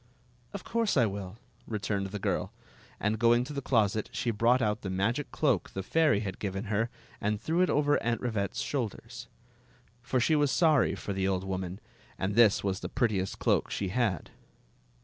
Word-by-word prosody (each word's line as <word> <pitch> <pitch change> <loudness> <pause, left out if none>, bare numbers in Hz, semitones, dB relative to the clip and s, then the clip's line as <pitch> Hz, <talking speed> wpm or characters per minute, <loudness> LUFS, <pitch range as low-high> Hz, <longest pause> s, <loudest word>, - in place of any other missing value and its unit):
"Of 200 - -7
course 230 -6 0
I 125 - +6
\*ill," 100 -1 -5 0.3
returned 100 -2 -2
the 100 +2 -5
girl; 100 - -1 0.5
and 105 +1 0
going 120 +1 +4
to 140 +4 -7
the 140 - -3
closet, 110 -5 +1
she 120 - -1
brought 115 +4 +3
out 105 -1 0
the 95 - -4
magic 105 +10 -1
cloak 135 - +1
the 95 - -5
fairy 150 - +3
had 95 -3 -5
given 95 0 -3
her 115 +3 +1 0.3
and 105 0 0
threw 165 +8 0
it 185 - +3
over 145 0 +2
Aunt 120 0 0
Rivette's 110 0 -2
shoulders. 120 -2 -4 0.7
For 130 0 0
she 155 +6 +3
was 145 -1 +3
sorry 155 -3 +3
for 100 - -5
the 95 0 0
old 95 -1 0
woman, 95 0 -4 0.4
and 95 +2 -1
this 110 -2 +5
was 95 -1 -1
the - - -5
prettiest 105 -6 0
cloak - - +1
she 95 - -2
had. 105 -6 -1
110 Hz, 185 wpm, -29 LUFS, 100-130 Hz, 0.7 s, I